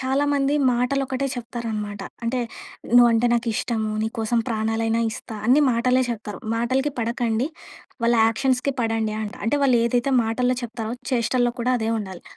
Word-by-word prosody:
చాలామంది 280 +1 +1 0.2
మాటలొకటే 265 +2 0
చెప్తారనమాట. 220 -4 -5 0.2
అంటే, 250 +2 0 0.6
నువ్వంటే 240 -1 +6
నాకిష్టము, 230 -1 -1
నీ 220 - 0
కోసం 225 +2 +1
ప్రాణాలైనా 225 0 0
ఇస్తా, 220 - -8
అన్నీ 265 +5 +5
మాటలే 250 +2 +2
చెప్తారు. 210 -2 -5 0.2
మాటలకి 260 +5 0
పడకండి. 235 +2 0 0.6
వాళ్ళ 235 - +4
యాక్షన్స్‌కి 260 +4 +1
పడండి 225 -1 0
అంట. 205 - -5
అంటే, 290 +5 +2
వాళ్ళేదైతే 245 +1 +2
మాటల్లో 250 +3 0
చెప్తారో, 230 -1 -4 0.2
చేష్టల్లో 245 0 +1
కూడా 250 +2 +1
అదే 220 0 -1
ఉండాలి. 190 -4 -7
235 Hz, 130 wpm, -23 LUFS, 225-255 Hz, 0.6 s, నువ్వంటే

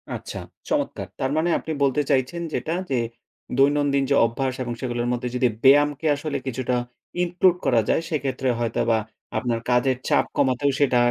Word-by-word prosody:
আচ্ছা, - - -7 0.3
চমৎকার! - - -1
তারমানে 155 +6 +1
আপনি 160 - -6
বলতে 140 +1 +2
চাইছেন 130 +6 +1
যেটা, 160 - -2 0.2
যে, - - +2 0.6
দৈনন্দিন 140 0 +3
যে - - +5
অভ্যাস 130 +3 -1
এবং 120 -1 -4
সেগুলোর 120 -1 -2
মধ্যে 125 0 -2
যদি 125 0 +3 0.2
ব্যায়ামকে 145 +2 +5
আসলে 145 0 -3
কিছুটা 130 0 -1 0.5
include 180 0 +3
করা 120 -4 +4
যায়, - - +3
সেক্ষেত্রে 135 -4 -1
হয়তোবা 115 0 +1 0.4
আপনার 120 -2 -1
কাজের 125 +1 +3
চাপ - - +3
কমাতেও 135 +2 +2
সেটা 135 -4 +3
135 Hz, 150 wpm, -24 LUFS, 125-145 Hz, 0.6 s, যে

